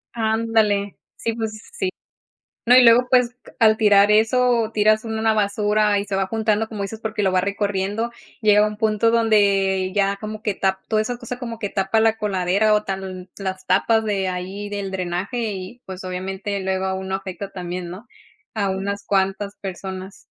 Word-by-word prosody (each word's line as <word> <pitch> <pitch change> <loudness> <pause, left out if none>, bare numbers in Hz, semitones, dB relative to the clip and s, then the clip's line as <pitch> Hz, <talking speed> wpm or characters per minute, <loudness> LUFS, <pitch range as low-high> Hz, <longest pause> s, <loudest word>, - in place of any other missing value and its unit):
Ándale. 220 -3 +1 0.2
Sí, 230 - -2
pues, 220 -1 -4
sí. 395 -6 -1 0.8
No, 245 - +7
y 255 - +8
luego, 235 +2 +6
pues, 250 -1 +3 0.3
al 220 -1 +6
tirar 205 -2 +5
eso, 230 +1 +3
tiras 215 +1 +3
una 220 0 0
basura 210 0 +2
y - - -4
se 200 - -4
va 195 0 0
juntando, 220 +1 0
como 215 -3 -5
dices, 215 +2 -6
porque 220 -1 -3
lo 190 - +3
va 185 - +3
recorriendo. 200 +3 -1 0.3
Llega 210 0 +5
un 210 0 -4
punto 220 +1 +2
donde 200 -4 +2
ya 200 -1 +1
como 215 0 -6
que 210 -3 -1
tap 190 0 0
toda 215 -1 +2
esa 245 +3 -3
cosa 245 0 -6
como 235 -2 -6
que 205 - -2
tapa 195 +2 +1
la 225 0 +3
coladera 200 +1 +2
o 210 - +2
tan 190 -1 -5
las 190 -1 -4
tapas 220 +4 +3
de 200 -3 -1
ahí 185 +3 -5
del 200 -1 -4
drenaje 190 +5 -3
y, 195 +6 -8
pues, 190 -1 -7
obviamente, 190 +2 -4
luego 190 0 -1
a 190 - -1
uno 190 0 -4
afecta 195 +1 -5
también, 180 -1 -5
¿no?, 190 +7 -10 0.5
a 200 -3 0
unas 200 +1 -3
cuantas 195 +1 0
personas. 190 0 -7
205 Hz, 180 wpm, -22 LUFS, 190-220 Hz, 0.8 s, y